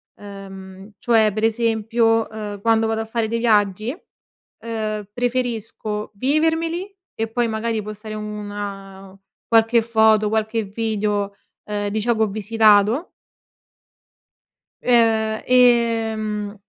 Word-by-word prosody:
Uhm, 195 0 -11
cioè 220 -3 +3
per 215 +1 -3
esempio, 225 0 +1
ehm, 210 -2 -7
quando 225 0 +3
vado 220 0 -1
a - - -4
fare 225 0 -2
dei 230 +1 -2
viaggi, 215 -1 +2 0.7
uhm, 215 -2 -4
preferisco 230 -4 -3
vivermeli 325 - 0 0.2
e 225 0 -2
poi 240 +1 0
magari 220 0 -2
può 215 +1 -7
stare 215 +1 -8
una 205 -2 -7 0.3
qualche 225 0 +4
foto, 220 -2 +3
qualche 220 +1 -1
video, 205 -1 -2 0.3
uhm, 205 -1 -3
di 215 +1 -2
ciò 235 +1 +1
che 220 - -2
ho - - +2
visitato. 215 - +2 1.7
Uhm, 225 -3 +2
ehm, 225 -4 +2
220 Hz, 115 wpm, -21 LUFS, 210-230 Hz, 1.7 s, qualche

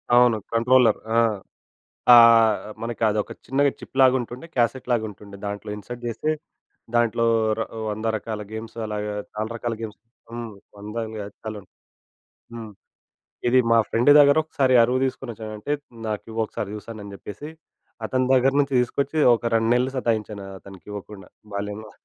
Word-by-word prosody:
అవును 120 -2 +5 0.2
కంట్రోలర్. 115 -1 +4 0.2
ఆ! - - +4 1.0
ఆహ్, 115 -2 +7 0.3
మనకి 115 0 -5
అదొక 105 0 -1
చిన్నగా 140 +3 +2
చిప్‌లాగా 130 -1 +3
ఉంటుండే, 120 +6 -8
క్యాసెట్‌లాగా 120 -1 +1
ఉంటుండే, 100 0 -12
దాంట్లో 100 0 -5
ఇన్సర్ట్ 120 +4 -9
జేస్తే, 120 +6 -2 0.6
దాంట్లో 115 0 +2 0.3
ర - - +1 0.3
వంద 110 +2 -4
రకాల 110 0 -5
గేమ్స్ 110 +1 -7
అలాగా, 105 -1 -3 0.2
చాలా 110 +1 -3
రకాల 115 0 -3
గేమ్స్ 110 -2 -7 0.3
హ్మ్. 120 -1 -5 0.3
వందలు 110 +2 -5
కాదు 100 0 -8
చాలా 110 -1 -5
ఉం - - -23 0.9
హ్మ్. 115 -2 -8 0.8
ఇది 130 +2 +4
మా 115 - +6
ఫ్రెండ్ 120 +5 +3
దగ్గర 140 0 +6
ఒకసారి 135 -4 +1
అరువు 125 +2 +2
దీసుకొనొచ్చాను. 115 -4 -5
అంటే 125 +8 -3 0.4
నాకు 105 -1 -3
ఇవ్వు. 110 +1 -3
ఒకసారి 105 - -5
జూస్తాను 105 0 -8
అని 100 - -9
జెప్పేసి, 105 +9 -9 0.6
అతని 130 +2 0
దగ్గర 130 +1 +4
నుంచి 140 -1 -1
తీసుకొచ్చి, 140 +5 -1 0.2
ఒక 120 - -5
2 115 0 +1
నెలలు 125 +2 +1
సతాయించాను 110 -5 -2
అతనికి 95 -1 -14
ఇవ్వకుండా 100 -2 -9 0.3
బాల్యంలో. 105 +2 -5
115 Hz, 145 wpm, -23 LUFS, 105-125 Hz, 1.0 s, ఆహ్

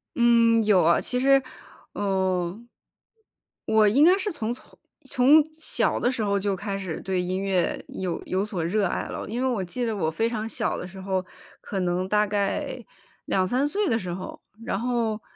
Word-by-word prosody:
嗯， 230 -1 +4
有 205 -4 +4
啊， 170 +2 +4
其 250 - -1
实， 275 +1 +5 0.5
嗯。 190 +1 -1 1.1
我 215 -1 +5
应 270 +9 +4
该 365 +4 +6
是 410 +1 -2
从 225 -7 -3
从 245 - -10 0.3
从 280 +5 +5
小 315 0 0
的 245 - +2
时 235 -4 -2
候 200 -1 +1
就 195 0 -1
开 200 +1 -4
始 185 -5 -5
对 185 -1 -1
音 185 +1 -2
乐 190 -3 0
有 180 -3 -3
有 190 +1 -1
所 195 -6 -3
热 200 +2 +1
爱 - - -3
了， - - -6
因 235 +4 -3
为 - - +2
我 230 -7 -1
记 240 +8 -3
得 225 -2 -1
我 160 -5 0
非 225 +8 0
常 225 -2 -3
小 220 -2 -1
的 180 - -6
时 190 +1 -11
候， 190 -1 -1 0.4
可 195 - -4
能 180 +1 -1
大 210 0 +3
概 200 -1 -2 0.4
2-3 245 +10 +1
岁 405 +5 0
的 225 - +1
时 180 -4 -5
候， 185 +2 -7 0.2
然 195 - -1
后 230 -3 -1
210 Hz, 200 characters per minute, -25 LUFS, 185-240 Hz, 1.1 s, 该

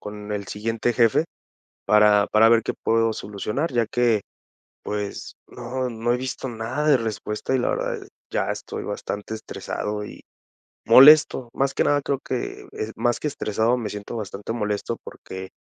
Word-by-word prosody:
con 105 0 -7
el 100 -1 -3
siguiente 115 +3 -1
jefe 120 +7 +3 0.6
para 105 -1 +5
para 110 +1 +5
ver 115 0 +5
qué - - -2
puedo 115 0 +1
solucionar, 105 - -3
ya 115 -2 +2
que, 120 -3 +2 0.6
pues, 105 -1 -5
no 130 +2 -4
no 120 0 -1
he - - +2
visto 130 +1 -4
nada 120 +6 -2
de 145 - +7
respuesta 110 +1 -3
y, - - +3
la - - 0
verdad, - - -2
eh, - - -12 0.2
ya - - -1
estoy - - -5
bastante 105 +2 -5
estresado 105 -1 -5
y - - -11 0.6
molesto. 130 0 +7
Más 135 0 0
que - - +2
nada, 145 0 +3
creo 135 -1 -1
que 125 -2 -4
es, 110 +1 -5
más 120 -1 0
que 150 - -1
estresado, 115 -2 0
me 115 -4 -4
siento 105 +2 -6
bastante 100 0 -5
molesto 105 -3 -2
porque 95 0 -9
115 Hz, 170 wpm, -23 LUFS, 105-125 Hz, 0.6 s, de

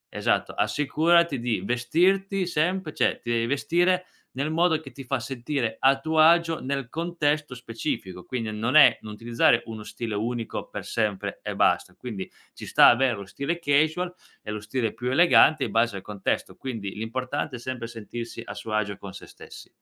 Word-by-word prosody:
esatto, - - 0
assicurati 160 +1 +2
di 120 -2 -1
vestirti 185 +10 +1
sempre 170 0 -1
cioè - - +1
ti 120 - -4
devi 115 0 +1
vestire 175 +6 +1 0.3
nel 140 +4 -2
modo 165 0 +2
che 145 -4 -12
ti 135 - -10
fa 130 +1 -1
sentire 120 -1 -3
a 135 0 +4
tuo 160 +2 -1
agio 165 +1 +5
nel 135 -2 -2
contesto 155 -4 -1
specifico, 115 -7 -5
quindi 115 -4 -4
non 110 +5 -2
è 155 - +7
non 110 -1 -8
utilizzare 115 +1 +2
uno 110 -2 -7
stile 115 0 -5
unico 115 +2 -3
per - - -7
sempre 105 -4 -2
e - - -4
basta. - - +1
Quindi 110 -7 -7 0.2
ci - - -9
sta - - +6
avere 130 +1 +3
lo 100 -1 -8
stile 145 - -3
casual 160 +4 +1 0.3
e 105 - -9
lo 105 - -4
stile 110 +1 -2
più 125 +2 -3
elegante 155 -1 +5
in - - -5
base 115 -3 +1
al - - -7
contesto. 100 -1 -3
Quindi 110 -7 -6
l'importante 130 +5 -3
è - - -11
sempre 120 -1 -5
sentirsi 115 +1 -7
a - - -8
suo 110 - -6
agio 100 -2 -1
con 100 -1 -9
sé - - -11
stessi. - - -13
130 Hz, 180 wpm, -25 LUFS, 115-155 Hz, 0.3 s, è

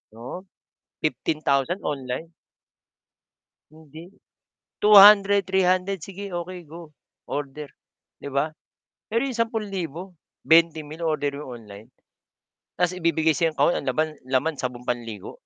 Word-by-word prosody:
oo, 125 +11 -8 0.6
15,000 155 +1 0
online. 140 +4 -5 1.4
Hindi, 160 +1 -13 0.7
200, 200 -1 +7
300 185 -1 +1
sige 200 +1 -8
okey 175 -1 -6
go, 165 -1 -11 0.3
order, 145 0 -6 0.5
'di - - -7
ba? 140 +3 -1 0.6
Pero 230 - +2
'yong 255 - -5
₱10,000, 195 -7 -3 0.2
20,000 160 -1 +2
o-orderin 145 -2 -2
mo 125 - -9
online, 110 +1 -12 0.8
tas 180 0 +1
ibibigay 160 -2 +1
sa'yong 165 -2 +1
kahon 175 - +3
ang - - -5
laman 155 0 0 0.2
laman 135 +4 0
sabong 125 -2 -4
panligo. 115 -5 -4
160 Hz, 110 wpm, -24 LUFS, 140-185 Hz, 1.4 s, 200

